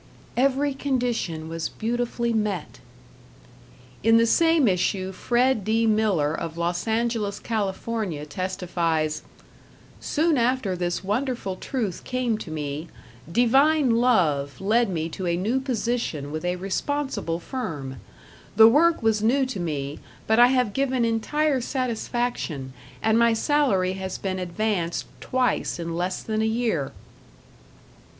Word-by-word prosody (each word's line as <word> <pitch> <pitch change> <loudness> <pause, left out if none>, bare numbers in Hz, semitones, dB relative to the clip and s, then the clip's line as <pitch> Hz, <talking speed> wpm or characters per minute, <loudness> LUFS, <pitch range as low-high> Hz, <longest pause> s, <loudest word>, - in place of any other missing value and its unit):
"Every 275 +2 +2
condition 245 - -2
was 165 0 -3
beautifully 235 +1 -2
met." 210 -7 -2 1.2
In 225 +1 +5
the 230 - +5
same 325 +2 +4
issue 185 0 0
Fred 240 +3 +1
D. 225 +3 +2
Miller 210 -9 +2
of 165 0 -5
Los 175 +4 -1
Angeles, 225 -3 0
Cal., 215 -4 -1
testifies: 170 -5 -2 0.8
"Soon 310 -2 +1
after 235 -5 +1
this 175 0 -2
wonderful 220 -1 -2
truth 215 -3 -3
came 250 -4 -1
to 175 - -7
me, 150 0 -4 0.4
Divine 270 - +4
Love 160 - +2
led 220 +3 +2
me 165 -3 -2
to 180 +2 -5
a 170 0 +1
new 220 +9 0
position 235 - -2
with 155 +3 -4
a 180 0 0
responsible 195 0 -2
firm. 150 - -5 0.6
The 220 +1 +9
work 315 +4 +4
was 220 -1 +2
new 260 +5 +3
to 255 -6 -5
me, 145 -4 -3 0.3
but 220 +1 +3
I 245 - +9
have 250 -5 +1
given 260 -3 +1
entire 270 +5 +1
satisfaction, 240 - -2 0.3
and 220 +1 +3
my 235 -1 +5
salary 220 -8 +2
has 190 -1 -5
been 185 -1 -3
advanced 180 -1 -1
twice 255 -6 0
in 165 -1 -4
less 180 +2 -2
than 215 -1 -1
a - - +2
year." 220 - 0
220 Hz, 130 wpm, -25 LUFS, 175-245 Hz, 1.2 s, The